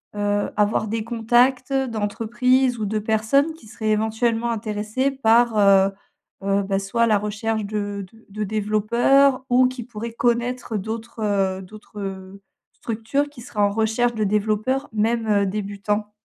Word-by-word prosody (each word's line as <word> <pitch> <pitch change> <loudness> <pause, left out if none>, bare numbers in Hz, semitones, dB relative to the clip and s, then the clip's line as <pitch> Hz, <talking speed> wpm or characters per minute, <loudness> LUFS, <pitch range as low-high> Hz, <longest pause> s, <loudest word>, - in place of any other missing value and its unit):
heu, 205 0 0
avoir 210 +1 +1
des 220 +1 -2
contacts, 240 +3 +2
d'entreprises 245 +1 +1
ou 215 - -2
de 215 +1 -1
personnes, 220 +8 +2
qui 315 -7 -17
seraient 215 0 -4
éventuellement 225 +2 0
intéressées 215 +3 -1
par, 235 -3 +3
heu, 195 -1 +5 0.5
heu, 200 0 +1
bah, 195 0 -1
soit 230 +4 +1
la 215 -2 +4
recherche 210 +1 -2
de 205 -1 -4
de 225 0 -20
de 210 +2 -4
développeurs 235 +6 +2
ou 250 +1 +5
qui 255 -1 -6
pourraient 230 0 -7
connaître 240 -1 -1
d'autres, 225 +3 -6
heu 195 -2 0
d'autres, 210 +2 -12
heu, 195 0 -7 0.3
structures 235 +6 -2
qui 285 -4 -13
seraient 230 -2 -8
en 205 - +4
recherche 225 +3 +1
de 215 - 0
développeurs, 215 +6 0
même, 225 +1 0
heu, 200 -1 +3
débutants? 205 +1 -3
220 Hz, 150 wpm, -22 LUFS, 205-240 Hz, 0.5 s, heu